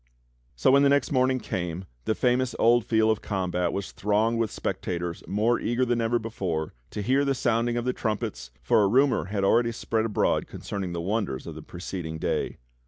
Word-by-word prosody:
So - - +3
when 140 +1 +6
the 140 - +5
next 140 0 +2
morning 130 -1 +2
came 90 -3 -4 0.2
the 110 - +1
famous 125 0 +1
old 120 0 +4
field 110 -1 +3
of 110 - -1
combat 90 -3 -1
was 100 0 -4
thronged 110 +3 +1
with 115 -2 +1
spectators 85 -3 -3
more 110 +4 +1
eager 120 +2 0
then 120 -1 +1
ever 115 +1 +2
before 95 -9 -3 0.2
to 105 - -4
hear 135 +5 +3
the 140 -1 +1
sounding 120 0 +1
of 120 - -2
the 125 - +1
trumpets, 95 - -3
for 85 - +4
a 100 - +4
rumor 130 +5 +3
had 100 0 -2
already 115 +4 +3
spread 110 -1 -1
abroad 110 - +1
concerning 95 -3 -5
the 85 - -3
w^onders 95 - -2
of - - -6
the - - -9
preceding 85 -2 -6
day. - - -2
110 Hz, 195 wpm, -26 LUFS, 95-120 Hz, 0.2 s, when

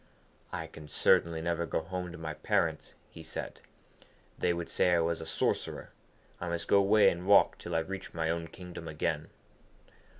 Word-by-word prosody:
'I 80 - -3
can 80 -1 -11
certainly 80 +2 +3
never 85 0 -1
go - - 0
home 90 +1 -5
to 85 - -8
my 80 -1 -4
parents,' - - 0 0.2
he 80 - -10
said. 80 0 -6 0.8
'They 90 - +2
would 85 -1 -3
say 90 -1 +3
I - - +3
was 85 0 0
a 80 - -6
sorcerer. - - -1 0.5
I 85 - -3
must 85 0 -3
go 100 - +6
away 100 0 +6
and 90 +2 -6
walk 100 0 +6
till 85 - -5
I 80 - +3
reach 95 +4 -6
my 80 -1 -1
own 85 0 -3
kingdom 85 -1 -9
again.' 80 0 -2
85 Hz, 180 wpm, -31 LUFS, 80-90 Hz, 0.8 s, go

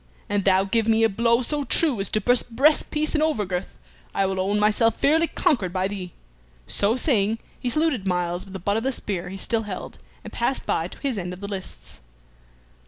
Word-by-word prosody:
An 205 0 +1
thou 190 0 +3
give 220 +3 0
me 225 0 +3
a 225 - +5
blow 235 +4 +2
so 295 +3 -1
true 280 -4 +2
as 195 - -2
to 215 - +1
burst 245 +1 +1
breast 295 +5 +4
piece 305 0 -1
and 305 - +1
over 305 -10 +1
girth, 180 0 -4 0.4
I 195 - +2
will 190 0 -2
own 200 +2 +1
myself 215 +2 +3
fairly 320 +4 +3
conquered 200 - +1
by 185 +1 0
thee." 190 -3 -6 0.5
So 205 +3 +1
saying, 225 -5 +2 0.2
he 250 - -2
saluted 285 -7 +1
Myles 175 -1 0
with 195 - -12
the 190 - -5
butt 200 +4 0
of - - 0
the 265 - +1
spear 190 -7 -4
he 195 - -7
still 225 +3 0
held, 205 -4 -7 0.2
and - - -10
passed 240 +3 -1
by 165 - 0
to - - -12
his 265 -7 -1
end 180 0 -4
of 180 - -10
the 200 - -6
lists. 195 - -7
210 Hz, 220 wpm, -24 LUFS, 190-245 Hz, 0.5 s, a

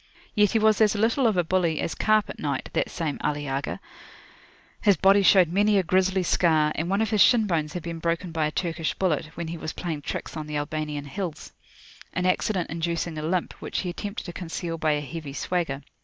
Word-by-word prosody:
Yet 210 -2 +3
he - - +4
was 220 0 +3
as 215 0 +4
little 230 +5 +2
of 215 -4 +1
a 175 - +3
bully 170 -2 +1
as - - -2
carpet 215 -1 +1
knight, 140 -3 -3
that - - 0
same 160 -5 -3
Ali 145 0 -1
Agha; 135 0 -3 1.0
his 205 -4 +4
body 195 +1 +5
showed 185 -2 +6
many 205 +3 +3
a 190 - +3
grisly 185 +1 +2
scar, 155 -4 +3
and 165 +2 -2
one 200 +3 +2
of 220 - -2
his 210 -2 +3
shin 235 -3 +6
bones 160 -5 -1
had 180 - -5
been 170 -1 -5
broken 170 +2 -1
by 160 -2 0
a - - -4
Turkish 165 -1 -2
bullet, 165 -5 0
when 170 -1 -4
he 170 0 -5
was 155 - -4
playing 160 -4 -4
tricks 145 - -5
on 155 -1 -5
the 150 -1 -3
Albanian 150 -1 -3
hills, 170 +2 -5 0.6
an 180 - -1
accident 185 -1 0
inducing 170 0 -2
a - - -4
limp, 170 +3 -1
which - - -3
he 180 - -3
attempted 205 +4 -6
to 175 - -6
conceal 165 -1 -5
by 155 -1 +2
a 145 - -1
heavy 150 -1 -7
swagger. 145 -4 -2
170 Hz, 215 wpm, -25 LUFS, 155-195 Hz, 1.0 s, showed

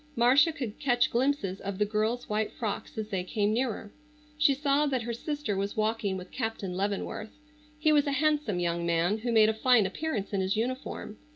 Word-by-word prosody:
Marcia 260 +7 +5
could 250 -9 -6
catch 245 -4 +2
glimpses 240 -7 0
of 200 -1 -4
the 210 - +2
girls' 215 +3 -1
white 215 0 -1
frocks 215 -2 -4
as 215 -1 -3
they 190 -3 -1
came 205 +2 0
nearer. 225 -3 -2 0.4
She 300 -2 +4
saw 285 +1 +2
that 260 -4 -1
her 235 +1 -3
sister 290 -2 -3
was 200 +2 -3
walking 215 -3 0
with 185 0 -9
Captain 225 -6 -3
Leavenworth. 205 +4 -3 0.4
He 305 +1 +3
was 295 -1 +4
a 280 - +1
handsome 295 -9 +1
young 170 -1 -1
man 170 +5 +1
who 240 +2 -2
made 220 -2 +6
a - - +1
fine 225 -1 +4
appearance 205 -1 -3
in 195 - +1
his 190 +1 0
uniform. 240 -2 -4
220 Hz, 195 wpm, -29 LUFS, 200-265 Hz, 0.4 s, made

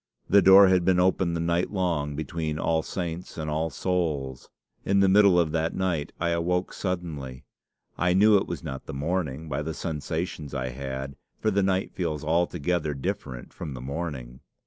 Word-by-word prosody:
The 100 +1 +6
door 95 +1 +8
had 95 -1 +3
been 90 0 +3
open 90 -1 +2
the - - -2
night 85 +2 0
long 85 -7 -1
between 80 0 -3
All 80 0 +1
Saints 85 +1 -5
and 75 -1 -3
All 80 +2 0
Souls. 75 -9 -2 0.3
In 100 0 +2
the 100 - +5
middle 100 -2 +6
of 80 -3 +1
that 80 0 -1
night 85 -5 -1
I 85 - 0
awoke 90 +2 0
suddenly. 80 -9 -4 0.5
I 90 0 +2
knew 105 +2 +6
it 95 - -1
was 85 - -5
not 70 -4 -6
the - - -6
morning 80 0 -2
by 70 -1 -2
the 80 +1 -4
sensations 80 -2 -4
I 65 -1 -2
had, 65 +1 -6 0.2
for 110 - +1
the 100 0 +2
night 95 0 0
feels 80 -5 -3
altogether 85 -1 0
different 65 -2 -5
from 75 -6 -6
the - - -7
morning. 65 -3 -5
85 Hz, 180 wpm, -26 LUFS, 75-90 Hz, 0.5 s, door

